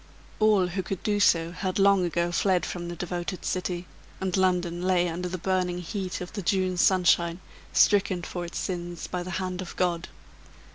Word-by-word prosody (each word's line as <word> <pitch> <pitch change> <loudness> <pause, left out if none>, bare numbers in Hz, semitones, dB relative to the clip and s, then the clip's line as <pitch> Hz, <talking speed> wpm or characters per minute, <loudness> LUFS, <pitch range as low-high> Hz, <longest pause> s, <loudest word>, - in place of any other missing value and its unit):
All 215 -3 +4
who 190 +2 -2
could 185 0 -5
do 205 -1 +1
so 165 -4 +3
had 185 +1 -3
long 200 -1 +5
ago 170 0 0
fled 180 -1 +2
from 175 -1 -5
the 175 - -5
devoted 175 +1 -4
city; 180 -1 -2 0.3
and 190 -2 -1
London 180 -2 +1
lay 180 -1 +2
under 175 +2 -3
the 185 - -3
burning 180 0 0
heat 185 +1 -4
of 180 - -7
the 205 - -3
June 185 0 +1
sunshine, 175 -1 +3 0.3
stricken 190 -3 +3
for 175 +1 -4
its 170 - -6
sins 175 -2 -4
by 180 - -3
the 180 - -6
hand 185 -1 -3
of 185 - -8
God. 175 -1 0
180 Hz, 185 wpm, -27 LUFS, 175-190 Hz, 0.3 s, long